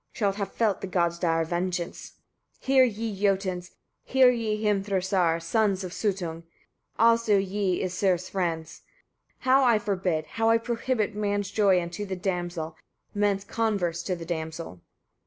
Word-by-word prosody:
shalt 200 Hz, -4 st, 0 dB
have 200 Hz, -2 st, -3 dB
felt 215 Hz, -5 st, 0 dB
the -, -, -4 dB
gods' 170 Hz, -2 st, 0 dB
dire 165 Hz, -2 st, +1 dB
vengeance. 175 Hz, +1 st, -3 dB, 0.5 s
34. -, -, -22 dB
Hear 265 Hz, -1 st, +6 dB
ye, 225 Hz, -2 st, -3 dB
Jotuns! 190 Hz, -3 st, 0 dB, 0.3 s
hear 260 Hz, -1 st, +5 dB
ye, 220 Hz, -3 st, -2 dB
Hrimthursar! 190 Hz, -4 st, +1 dB
sons 195 Hz, +3 st, +1 dB
of 180 Hz, -, -5 dB
Suttung! 180 Hz, -6 st, -2 dB, 0.6 s
also 230 Hz, -2 st, +4 dB
ye, 195 Hz, -1 st, 0 dB
Æsir's 185 Hz, -1 st, 0 dB
friends! 165 Hz, -4 st, -3 dB, 0.6 s
how 265 Hz, +1 st, +4 dB
I 235 Hz, -3 st, +5 dB
forbid, 185 Hz, -6 st, -1 dB
how 225 Hz, +5 st, 0 dB
I 230 Hz, -, +5 dB
prohibit 230 Hz, -1 st, -1 dB
man's 205 Hz, -1 st, -1 dB
joy 195 Hz, -4 st, +4 dB
unto 175 Hz, +4 st, -5 dB
the 190 Hz, -, -3 dB
damsel, 175 Hz, -3 st, -3 dB, 0.4 s
man's 205 Hz, -1 st, +1 dB
converse 200 Hz, -7 st, -1 dB
to 185 Hz, +1 st, -2 dB
the 170 Hz, -1 st, -8 dB
damsel. 160 Hz, -, -5 dB
195 Hz, 145 wpm, -27 LUFS, 175-215 Hz, 0.6 s, Hear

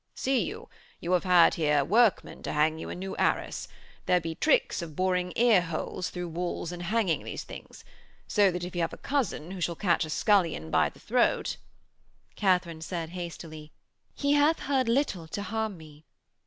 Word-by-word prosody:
'See 265 Hz, -1 st, +1 dB
you, -, -, -6 dB, 0.3 s
you 170 Hz, -, -4 dB
have 180 Hz, 0 st, +2 dB
had 180 Hz, -2 st, +6 dB
here 150 Hz, -3 st, +2 dB
workmen 220 Hz, -, +2 dB
to -, -, -4 dB
hang 155 Hz, +1 st, +2 dB
you -, -, -6 dB
a -, -, -5 dB
new 190 Hz, +2 st, -5 dB
arras. -, -, 0 dB, 0.4 s
There 180 Hz, -, +4 dB
be 165 Hz, -1 st, -4 dB
tricks 160 Hz, -, +2 dB
of 160 Hz, -3 st, -7 dB
boring 180 Hz, 0 st, 0 dB
ear 230 Hz, -5 st, +5 dB
holes 170 Hz, +1 st, -4 dB
through 180 Hz, -1 st, -5 dB
walls 175 Hz, 0 st, -3 dB
in 175 Hz, -, -7 dB
hanging 190 Hz, -1 st, 0 dB
these -, -, -5 dB
things. -, -, -11 dB, 0.4 s
So 205 Hz, -2 st, +4 dB
that 180 Hz, -1 st, -3 dB
if 180 Hz, -, -5 dB
you 175 Hz, -, 0 dB
have 165 Hz, -, -1 dB
a -, -, -7 dB
cousin 240 Hz, -, -2 dB
who 190 Hz, -2 st, -6 dB
shall 170 Hz, 0 st, 0 dB
catch 175 Hz, -1 st, +1 dB
a 155 Hz, -, -6 dB
scullion 165 Hz, -, +1 dB
by -, -, +3 dB
the -, -, -19 dB
throat....' -, -, +1 dB, 0.8 s
Katharine 180 Hz, -4 st, +1 dB
said 165 Hz, -1 st, -4 dB
hastily: 165 Hz, -3 st, -8 dB, 0.4 s
'He 285 Hz, 0 st, +1 dB
hath 295 Hz, +3 st, +3 dB
heard 265 Hz, -3 st, +1 dB
little 230 Hz, -, 0 dB
to 200 Hz, +5 st, -4 dB
harm 220 Hz, -2 st, -3 dB
me.' 155 Hz, -1 st, -14 dB
180 Hz, 185 wpm, -28 LUFS, 165-205 Hz, 0.8 s, had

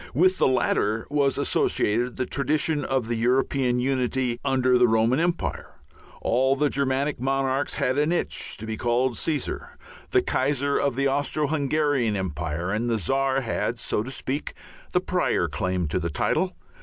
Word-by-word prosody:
With 185 Hz, +5 st, +3 dB
the -, -, +4 dB
latter 110 Hz, -4 st, +1 dB
was 140 Hz, -2 st, +2 dB
associated 120 Hz, -3 st, +1 dB
the 130 Hz, -, -1 dB
tradition 150 Hz, +2 st, 0 dB
of 135 Hz, -4 st, -1 dB
the 120 Hz, -, -1 dB
European 125 Hz, +1 st, +1 dB
unity 125 Hz, -1 st, 0 dB
under 130 Hz, -1 st, +2 dB
the 125 Hz, -, +5 dB
Roman 115 Hz, +4 st, +2 dB
empire; 175 Hz, +1 st, -2 dB, 0.5 s
all 130 Hz, +3 st, +2 dB
the 145 Hz, +1 st, +1 dB
Germanic 140 Hz, +1 st, 0 dB
monarchs 135 Hz, +1 st, 0 dB
had 130 Hz, +3 st, 0 dB
an 150 Hz, +3 st, +2 dB
itch 175 Hz, -, -1 dB
to 110 Hz, -, -7 dB
be 110 Hz, 0 st, -4 dB
called 120 Hz, +1 st, +1 dB
Caesar. 150 Hz, -5 st, -3 dB, 0.3 s
The -, -, +3 dB
Kaiser 140 Hz, +1 st, 0 dB
of 140 Hz, -3 st, 0 dB
the 140 Hz, +1 st, +1 dB
Austro 145 Hz, +2 st, 0 dB
Hungarian 145 Hz, -5 st, +1 dB
empire 85 Hz, -1 st, -3 dB
and 115 Hz, +3 st, -1 dB
the 115 Hz, -, +1 dB
Czar 135 Hz, +7 st, +1 dB
had, 120 Hz, 0 st, -2 dB
so 110 Hz, -, 0 dB
to 120 Hz, -, -6 dB
speak, 135 Hz, +2 st, -3 dB, 0.4 s
the -, -, +2 dB
prior -, -, 0 dB
claim 90 Hz, -2 st, -1 dB
to 90 Hz, -, 0 dB
the 85 Hz, -1 st, -2 dB
title. 185 Hz, -, 0 dB
130 Hz, 165 wpm, -25 LUFS, 115-140 Hz, 0.5 s, the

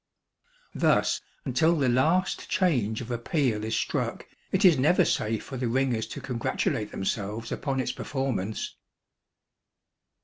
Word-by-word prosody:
Thus -, -, +2 dB, 0.2 s
until 165 Hz, +1 st, +3 dB
the 140 Hz, -3 st, +2 dB
last 155 Hz, +10 st, +2 dB
change 125 Hz, -, +1 dB
of 120 Hz, 0 st, -7 dB
a 120 Hz, -, -1 dB
peal 120 Hz, -5 st, 0 dB
is 110 Hz, +1 st, -1 dB
struck, -, -, -2 dB, 0.3 s
it 190 Hz, +2 st, +3 dB
is 175 Hz, -4 st, +8 dB
never 150 Hz, +7 st, +4 dB
safe 110 Hz, 0 st, 0 dB
for 130 Hz, -, -7 dB
the 125 Hz, -1 st, -1 dB
ringers 120 Hz, -2 st, 0 dB
to -, -, -7 dB
congratulate 115 Hz, -3 st, -1 dB
themselves 105 Hz, +3 st, -3 dB
upon 135 Hz, -2 st, -2 dB
its 130 Hz, -, 0 dB
performance. 125 Hz, -7 st, -3 dB
125 Hz, 135 wpm, -27 LUFS, 110-145 Hz, 0.3 s, is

